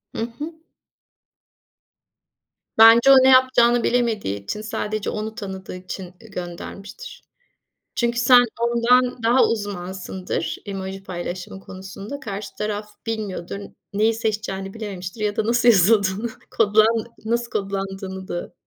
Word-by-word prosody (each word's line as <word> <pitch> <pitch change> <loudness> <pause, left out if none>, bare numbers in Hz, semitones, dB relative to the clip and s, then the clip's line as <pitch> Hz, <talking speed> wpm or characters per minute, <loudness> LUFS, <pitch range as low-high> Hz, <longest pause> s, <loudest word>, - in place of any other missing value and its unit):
Hı - - -3 0.2
hı. 320 +3 -5 2.2
Bence 230 +4 +8
o - - +10
ne 265 - +6
yapacağını 250 -2 +5
bilemediği 220 - 0
için 210 - -4
sadece 215 -1 -3
onu 215 +1 -4
tanıdığı 190 -2 -7
için, 185 +1 -7
ııı, 185 +5 -14
göndermiştir. 195 - -8 0.7
Çünkü 235 0 0
sen 245 0 +7 0.2
ondan 235 +1 +2
daha 240 +3 +5
uzmansındır, 190 -3 -3
emoji 195 -1 -5
paylaşımı 180 +1 -6
konusunda. 195 +8 -8
Karşı 200 -2 -6
taraf 210 0 -3 0.2
bilmiyordur. 205 -5 -4 0.4
Neyi 220 +3 +2
seçeceğini 210 -3 -3
bilememiştir 200 -2 -6
ya 210 -1 -1
da 215 - +1
nasıl 240 +1 +3
yazıldığını 200 +1 +4 0.2
kodlan 220 +1 +3 0.2
nasıl 235 +1 -1
kodlandığını 195 -1 -4
da, 175 - -5
210 Hz, 115 wpm, -22 LUFS, 190-235 Hz, 2.2 s, o